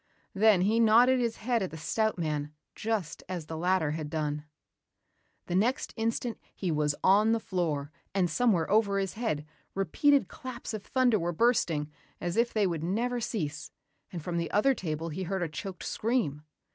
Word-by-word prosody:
Then 205 -2 +5
he 215 +5 +3
nodded 235 +3 +6
his 235 -2 0
head 235 0 0
at 190 - -1
the 160 - -8
stout 220 +8 0
man 150 -3 -2 0.2
just 215 -7 -2
as 175 -4 -4
the 160 - -6
latter 175 -2 +1
had 155 -1 -4
done. 150 -1 -2 1.0
The - - -4
next 225 +8 +1
instant 230 +1 -2 0.2
he 185 -3 -2
was 150 -1 +1
on 210 +4 +5
the 230 - +1
floor 155 -8 -2 0.2
and 190 -2 +2
somewhere 200 -5 +2
over 205 -2 +3
his 195 -2 -1
head, 215 -11 -2 0.3
repeated 220 - +3
claps 250 0 -7
of 215 - -4
thunder 245 0 +2
were 170 0 -1
bursting 165 -7 +1 0.3
as 175 +1 -3
if 235 +1 +2
they 215 -2 +2
would 165 -4 -2
never 235 +7 -1
cease 155 -10 -3 0.4
and 170 -4 -6
from 175 0 -2
the 170 0 -1
other 215 +7 +3
table 165 - -4
he 165 +4 -5
heard 190 0 -2
a - - 0
choked 180 +4 -7
scream. 220 - -1
190 Hz, 180 wpm, -29 LUFS, 160-225 Hz, 1.0 s, nodded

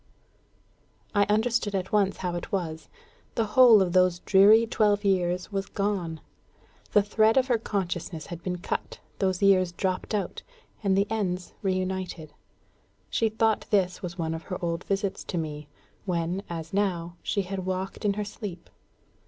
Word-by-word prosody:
I 205 -1 +4
understood 215 0 +1
at 190 -1 -2
once 200 -2 +2
how 175 - -1
it 175 - -5
was. 160 -5 -3 0.5
The 225 - +1
whole 235 -6 +8
of 175 -2 -3
those 185 -1 +4
dreary 205 +5 +6
twelve 210 -2 +1
years 180 -1 +1
was 195 -1 -2
gone. 190 -6 -2 0.7
The 205 - +6
thread 215 +3 +3
of 260 - +5
her 240 -2 +3
consciousness 175 -6 -3
had 175 -1 -8
been 180 +1 -3
cut, 175 - -4 0.2
those 190 -1 0
years 185 -3 +4
dropped 185 +4 -2
out, 205 - -3 0.4
and 195 -2 +2
the 200 - +3
ends 185 -5 -2
reunited. 185 -4 -2 0.8
She 225 - +2
thought 220 0 +1
this 190 -4 +1
was 180 -1 -6
one 160 -2 -2
of 165 - -5
her 185 - -4
old 170 0 -2
visits 195 -1 -2
to 180 - -3
me, 150 -2 -4 0.4
when, 175 0 -1
as 165 -1 -6
now, 175 -4 -1
she 200 - -1
had 190 0 -5
walked 185 +2 -3
in 205 -1 +2
her 210 +1 -3
sleep. 200 -3 -8
190 Hz, 160 wpm, -27 LUFS, 175-205 Hz, 0.8 s, whole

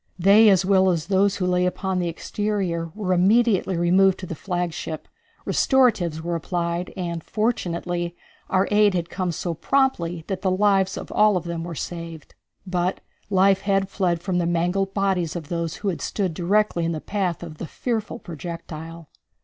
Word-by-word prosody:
They, 200 +4 +6
as 190 -2 +4
well 190 -1 +4
as 165 -3 0
those 195 +1 +2
who 185 - -1
lay 180 0 +2
upon 190 0 -2
the 175 - -1
exterior, 175 -1 -2
were 195 -4 -1
immediately 195 0 +3
removed 185 +2 +4
to - - -5
the 170 - -5
flagship, 175 -2 -4 0.4
restoratives 215 - +2
were 170 +1 -2
applied, 170 +1 -2
and, 170 -3 -3
fortunately, 175 -6 -2 0.3
our 190 0 +2
aid 205 -2 +4
had 170 -1 -2
come 185 -2 -1
so 170 +1 -3
promptly 175 - 0
that 190 -1 -4
the 190 - +1
lives 195 0 +2
of - - -7
all 210 -2 +4
of 175 - -3
them 170 -1 -4
were 170 -1 -6
saved. 165 -1 -7 0.3
But 180 0 -1 0.3
life 195 0 +4
had 195 -1 +1
fled 175 -4 -1
from 180 -2 0
the 170 - 0
mangled 180 +3 0
bodies 190 -5 0
of 160 -4 -6
those 170 -2 -2
who 205 - -2
had 180 - -4
stood 190 -5 -2
directly 185 +1 +1
in 165 0 0
the 155 - -3
path 185 -2 -2
of 155 -3 -9
the 170 - -5
fearful 230 +1 -3
projectile. 165 -2 -8
180 Hz, 175 wpm, -23 LUFS, 170-195 Hz, 0.4 s, They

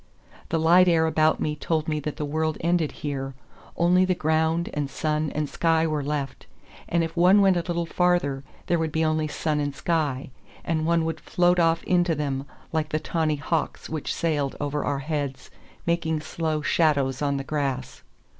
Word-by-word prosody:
The 165 - +1
light 175 +3 +6
air 165 -2 +4
about 155 -1 +2
me 150 0 -1
told 155 +1 -1
me 155 -1 0
that 150 0 -5
the 150 - -2
world 155 +1 -1
ended 170 -2 +1
here: 135 -2 -3 0.4
only 180 +2 +4
the 185 -1 +1
ground 160 +1 +1
and 145 -2 -2
sun 155 +1 -1
and 150 0 0
sky 165 +2 +1
were 155 -2 -1
left, 145 -2 -4 0.4
and 170 0 +2
if 165 0 -4
one 180 +4 +6
went 195 -2 +5
a - - +2
little 170 0 -2
farther 165 -6 +1 0.2
there 170 - +1
would 160 -1 -1
be 160 +1 +1
only 155 0 +1
sun 150 0 -1
and 145 -1 -2
sky, 145 -6 -1 0.3
and 160 -1 0
one 170 -1 +2
would 165 - -3
float 175 0 +2
off 165 -1 +2
into 175 -2 +2
them, 140 -2 -3 0.3
like 155 -1 0
the 155 - 0
tawny 160 -1 0
hawks 155 +2 -2
which 155 -2 -3
sailed 145 -5 -1
over 145 0 -2
our 140 - -1
heads 145 -4 -3 0.3
making 165 -2 0
slow 155 -1 -2
shadows 140 -6 +2
on 140 -1 +1
the 135 - -3
grass. 135 -3 -3
155 Hz, 185 wpm, -25 LUFS, 145-165 Hz, 0.4 s, light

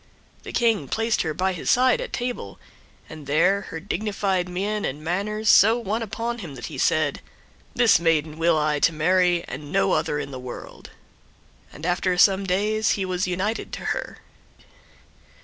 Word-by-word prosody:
The - - -8
King 225 - +1
placed 225 - 0
her 160 - -2
by 185 +5 -1
his 175 - -4
side 255 - +4
at - - -6
table, 245 - -4 0.5
and 155 -3 -11
there 180 +7 +3
her 160 - -5
dignified 195 -1 -2
mien 205 +4 -2
and 145 +3 -4
manners 210 +6 -2
so 220 +3 +6
won 225 -1 -2
upon 230 +2 -4
him, 165 -9 -8
that 120 - -7
he - - -7
said, - - +1 0.5
"This 240 -3 +5
maiden 160 -2 0
will 165 -1 +3
I 150 -1 +1
to 165 - +3
marry, 175 +2 +2
and 145 +2 -8
no 195 0 +2
other 155 -2 0
in 140 -1 -5
the 130 - -7
world," 125 -1 -9 0.8
and 150 - -9
after 180 +1 0
some 195 +1 +4
days 210 +4 +1
he 195 - -2
was 185 0 -1
united 190 +5 -2
to - - -6
her. - - -6
185 Hz, 170 wpm, -24 LUFS, 160-210 Hz, 0.8 s, so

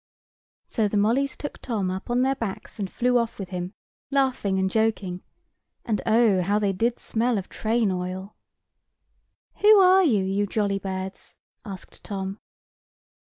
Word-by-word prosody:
So 220 -3 0
the 205 - -1
mollys 245 +7 +1
took 290 - -6
Tom 205 -7 -1
up 190 +4 -6
on 245 +1 +2
their 265 +1 +2
backs, 225 -4 -6
and 195 -2 -2
flew 245 0 +2
off 230 -1 -2
with 195 -3 -6
him, 180 0 -5 0.3
laughing 260 -8 +1
and 190 0 +2
joking—and 210 0 -3
oh, 220 -4 +4
how 200 +4 +1
they 205 -2 +1
did 230 +5 0
smell 235 +1 0
of 195 - -5
train 220 -2 0
oil! 185 +2 -4 1.2
"Who 425 0 +7
are 380 0 +6
you, 220 - +3
you 195 +2 0
jolly 200 -1 0
birds?" 190 0 -5 0.3
asked 195 -4 -10
Tom. 195 0 -5
210 Hz, 150 wpm, -25 LUFS, 190-235 Hz, 1.2 s, Who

